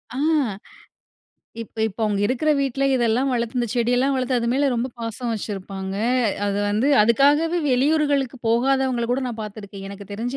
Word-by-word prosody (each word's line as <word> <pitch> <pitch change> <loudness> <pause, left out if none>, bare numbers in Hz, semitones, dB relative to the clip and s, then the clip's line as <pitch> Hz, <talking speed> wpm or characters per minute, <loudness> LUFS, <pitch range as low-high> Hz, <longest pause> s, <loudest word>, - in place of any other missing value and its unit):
ஆ. - - -4 1.4
இப்ப 230 - -12
இப்ப 205 - -11
அவுங்க 210 -2 0
இருக்கிற 255 +7 0
வீட்ல 275 0 -1
இதெல்லாம் 245 +1 +1
வளர்த்து 235 0 -2
அந்தச் 240 -1 -1
செடி 240 0 +1
எல்லாம் 270 +2 +2
வளர்த்து 255 0 0
அது 235 - -1
மேல 280 +1 +2
ரொம்ப 240 +2 -1
பாசம் 230 +1 -4
வச்சிருப்பாங்க. 195 -2 -5 0.5
அது 200 0 -1
வந்து 215 +7 +1
அதுக்காகவே 290 +9 +3
வெளியூர்களுக்குப் 275 -1 +1
போகாதவங்கள 255 +1 +1
கூட 260 +2 0
நான் 230 -2 -6
பாத்துருக்கேன். 200 -2 -8
எனக்குத் 200 0 -10
தெரிஞ்சு 235 +6 -4
240 Hz, 155 wpm, -22 LUFS, 215-265 Hz, 1.4 s, அதுக்காகவே